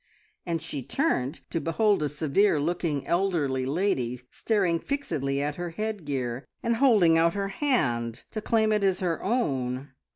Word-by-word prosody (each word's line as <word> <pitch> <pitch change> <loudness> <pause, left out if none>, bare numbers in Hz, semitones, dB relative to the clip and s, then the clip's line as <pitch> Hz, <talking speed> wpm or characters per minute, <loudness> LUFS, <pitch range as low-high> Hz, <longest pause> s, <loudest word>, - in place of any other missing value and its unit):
and 165 -2 -1
she 145 -4 -3
turned 140 - -1
to 165 - -1
behold 200 +5 +2
a 150 - 0
severe 155 +4 +2
looking, 155 -2 -1
elderly 160 -8 0
lady 135 -7 0
staring 190 -7 +1
fixedly 155 - -2
at 145 0 -3
her 175 0 -3
headgear, 145 - -3 0.2
and 235 -1 +1
holding 205 -11 +5
out 170 +2 +3
her 200 -1 -1
hand 120 - 0
to 215 - -4
claim 220 0 +2
it 210 -1 +2
as 190 -2 +2
her 175 -3 -1
own. 135 - -1
165 Hz, 155 wpm, -27 LUFS, 140-205 Hz, 0.2 s, holding